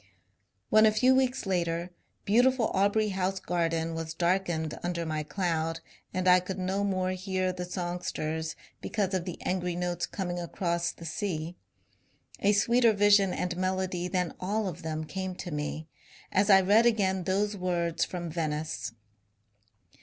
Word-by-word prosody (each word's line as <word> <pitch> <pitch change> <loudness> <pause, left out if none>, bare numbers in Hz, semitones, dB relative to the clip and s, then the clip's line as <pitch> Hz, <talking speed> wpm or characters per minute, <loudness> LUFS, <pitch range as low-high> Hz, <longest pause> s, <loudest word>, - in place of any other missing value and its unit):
'* - - -47
When 215 0 +7
a - - +5
few 255 +4 +4
weeks 260 -2 +1
later 175 -2 -1 0.3
beautiful 245 +3 +3
Aubrey 205 +2 +2
House 190 0 -1
garden 165 -2 -1
was 160 0 -5
darkened 170 -3 0
under 175 -1 -2
my 155 -1 -2
cloud 165 -1 -1 0.3
and 185 0 -1
I 180 0 +7
could 185 +1 -5
no 190 +2 -1
more 185 -2 0
hear 185 0 -1
the 180 0 -4
songsters 175 -3 -3 0.3
because 200 -3 -1
of 185 -2 -1
the 180 - -6
angry 180 -1 -1
notes 175 0 -2
coming 175 -3 -3
across 170 0 -1
the 165 - -12
sea, 165 -1 -3 0.8
a 205 +1 +3
sweeter 230 +3 +4
vision 205 -2 +5
and 180 -1 -2
melody 185 -1 -1
than 180 -2 -1
all 205 +3 -1
of 175 -1 -6
them 160 -1 -3
came 185 +3 -4
to 175 -1 -6
me 150 +1 -4 0.4
as 200 +2 +2
I 190 -1 +8
read 210 +5 +5
again 190 -5 +1
those 205 +2 0
words 170 -3 0
from 175 -2 -4
Venice. 155 -5 -3
185 Hz, 155 wpm, -29 LUFS, 170-195 Hz, 0.8 s, I